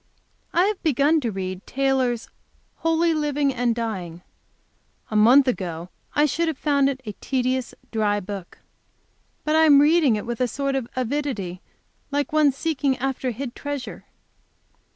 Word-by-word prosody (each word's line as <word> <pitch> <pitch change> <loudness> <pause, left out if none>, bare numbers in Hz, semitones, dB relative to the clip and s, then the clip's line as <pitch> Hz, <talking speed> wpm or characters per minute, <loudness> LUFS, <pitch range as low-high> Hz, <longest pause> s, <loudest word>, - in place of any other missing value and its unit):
I 350 - +3
have 420 -1 -1
begun 305 +1 +3
to 235 -4 -1
read 185 0 -5
Taylor's 260 -3 0 0.5
"Holy 330 +1 +2
Living 295 -2 0
and 245 -2 0
Dying." 185 -7 -4 0.9
A - - -3
month 250 +6 +6
ago 175 -7 -3 0.3
I 295 - +4
should 330 +3 0
have 320 -4 -2
found 280 -2 +2
it 270 -1 -3
a 210 - -4
tedious, 255 -1 -1 0.2
dry 210 -2 +1
book. 195 -2 -8 0.9
But 305 0 +1
I 320 0 +6
am 285 -3 +7
reading 295 -4 +4
it 210 - -4
with 240 +1 -4
a 250 - +3
sort 275 +2 -2
of 260 -3 -2
avidity, 250 -9 -2 0.5
like 290 +3 -2
one 305 -2 +5
seeking 275 -2 -1
after 265 0 -2
hid 245 +1 -5
treasure. 285 -3 -6
265 Hz, 150 wpm, -23 LUFS, 225-290 Hz, 0.9 s, am